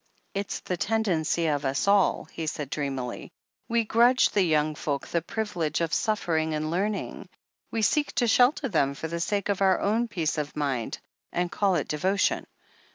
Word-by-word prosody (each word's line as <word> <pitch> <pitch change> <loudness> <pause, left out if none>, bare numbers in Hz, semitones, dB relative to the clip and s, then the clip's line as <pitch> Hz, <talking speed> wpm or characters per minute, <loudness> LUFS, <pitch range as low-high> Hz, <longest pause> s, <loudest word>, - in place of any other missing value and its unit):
"It's 200 0 -3
the 180 - -3
tendency 175 -6 0
of 145 -2 0
us 135 +4 0
all," 200 -1 +3
he 160 -1 -6
said 150 -2 -4
dreamily. 135 -4 -3 0.4
"We 230 0 +2
grudge 240 +4 +4
the 205 - +2
yoimg 155 0 +2
folk 140 -2 -2
the 170 - 0
privilege 170 -5 -2
of 165 -2 -1
suffering 160 -7 0
and 155 +1 -2
learning 200 +4 -2 0.2
— - - -51
^we 225 -2 +1
seek 295 +7 +1
to 240 - +1
shelter 255 +5 +4
them, 140 - +1
for 160 - -5
the 170 +1 -4
sake 200 +3 -1
of 200 -1 -1
our 190 -1 +4
own 225 +4 +1
peace 165 -7 -1
of 150 0 -4
mind, 135 -6 -2 0.3
and 175 0 -1
call 195 -3 +2
it 150 - -1
devotion." 190 +7 0
175 Hz, 180 wpm, -27 LUFS, 150-210 Hz, 0.4 s, grudge